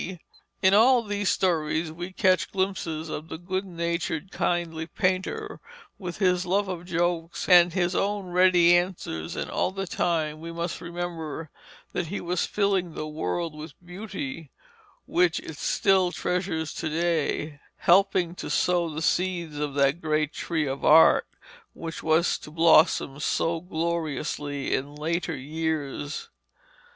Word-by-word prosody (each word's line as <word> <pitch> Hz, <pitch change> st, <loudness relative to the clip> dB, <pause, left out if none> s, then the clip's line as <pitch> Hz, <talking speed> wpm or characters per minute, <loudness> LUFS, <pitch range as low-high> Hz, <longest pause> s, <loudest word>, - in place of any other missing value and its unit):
In 190 Hz, +1 st, +6 dB
all 240 Hz, +3 st, +6 dB
these 205 Hz, -2 st, -1 dB
stories 160 Hz, -3 st, 0 dB
we 175 Hz, +3 st, -6 dB
catch 185 Hz, -1 st, +2 dB
glimpses 185 Hz, -5 st, -2 dB
of 155 Hz, +1 st, -6 dB
the -, -, -5 dB
good 185 Hz, +3 st, -3 dB
natured 170 Hz, 0 st, -3 dB
kindly 165 Hz, -2 st, -1 dB
painter, 190 Hz, -, -2 dB, 0.4 s
with 180 Hz, -4 st, -6 dB
his 180 Hz, -2 st, +2 dB
love 195 Hz, +2 st, +1 dB
of 180 Hz, -2 st, -5 dB
jokes, 175 Hz, -1 st, -1 dB
and 175 Hz, -1 st, +7 dB
his 175 Hz, +1 st, 0 dB
own 200 Hz, +1 st, 0 dB
ready 175 Hz, -1 st, +5 dB
answers, 175 Hz, -, -2 dB
and -, -, -4 dB
all -, -, +1 dB
the 195 Hz, +1 st, -4 dB
time 160 Hz, -3 st, -1 dB
we 165 Hz, +1 st, -6 dB
must 170 Hz, +1 st, -4 dB
remember 170 Hz, -3 st, -5 dB, 0.4 s
that 175 Hz, -, -2 dB
he 195 Hz, +6 st, -4 dB
was 175 Hz, 0 st, -1 dB
filling 195 Hz, -5 st, 0 dB
the 155 Hz, -, -4 dB
world 155 Hz, -, -3 dB
with 150 Hz, -1 st, -9 dB
beauty, 200 Hz, -, -6 dB, 0.6 s
which 175 Hz, -1 st, +2 dB
it 160 Hz, -, -9 dB
still 190 Hz, -2 st, +2 dB
treasures 175 Hz, -4 st, -2 dB
to 160 Hz, -, -3 dB
day, 155 Hz, -2 st, -1 dB, 0.2 s
helping 185 Hz, -1 st, +3 dB
to -, -, -7 dB
sow 175 Hz, -2 st, +1 dB
the 155 Hz, +1 st, -4 dB
seeds 170 Hz, -4 st, 0 dB
of 145 Hz, -2 st, -3 dB
that 140 Hz, +4 st, +2 dB
great 155 Hz, -1 st, 0 dB
tree 160 Hz, -3 st, -1 dB
of 135 Hz, 0 st, -4 dB
Art 160 Hz, +2 st, +6 dB, 0.5 s
which 165 Hz, 0 st, -6 dB
was 160 Hz, +2 st, +2 dB
to -, -, -11 dB
blossom 160 Hz, -3 st, +4 dB
so 165 Hz, +2 st, 0 dB
gloriously 160 Hz, -4 st, -2 dB
in 145 Hz, +2 st, -2 dB
later 165 Hz, +1 st, -2 dB
years. 155 Hz, -, -3 dB
170 Hz, 140 wpm, -26 LUFS, 155-185 Hz, 0.6 s, and